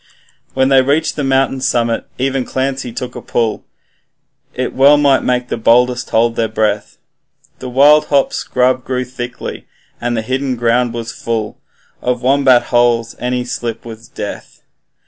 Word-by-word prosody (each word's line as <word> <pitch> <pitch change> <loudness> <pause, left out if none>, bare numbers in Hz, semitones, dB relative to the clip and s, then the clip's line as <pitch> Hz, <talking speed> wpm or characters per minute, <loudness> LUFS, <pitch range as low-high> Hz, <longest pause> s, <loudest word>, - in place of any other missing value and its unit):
When 130 0 +2
they 135 -1 +5
reached 140 +5 0
the 150 - -2
mountain's 135 0 +1
summit, 115 -2 0
even 135 0 -1
Clancy 130 -1 -3
took 125 +1 -6
a - - -6
pull, 115 -2 -2 0.9
It 130 0 -3
well 140 +2 +6
might 140 -2 +3
make 125 0 -1
the - - -2
boldest 125 +2 +2
hold 115 +1 +2
their 115 - 0
breath, 110 -1 -2 0.6
The 130 - -6
wild 145 +4 +5
hop 140 -2 +1
scrub 125 0 0
grew 130 -1 -2
thickly, 125 -1 -7 0.3
and 120 0 -1
the 110 - -2
hidden 130 +2 -2
ground 120 0 +1
was 115 0 -5
full 110 -2 -4 0.4
Of 125 -1 -2
wombat 130 -2 +4
holes, 120 -1 +1
and - - -8
any 125 0 -1
slip 120 -2 -5
was 115 0 -10
death. - - -8
125 Hz, 160 wpm, -16 LUFS, 120-130 Hz, 0.9 s, well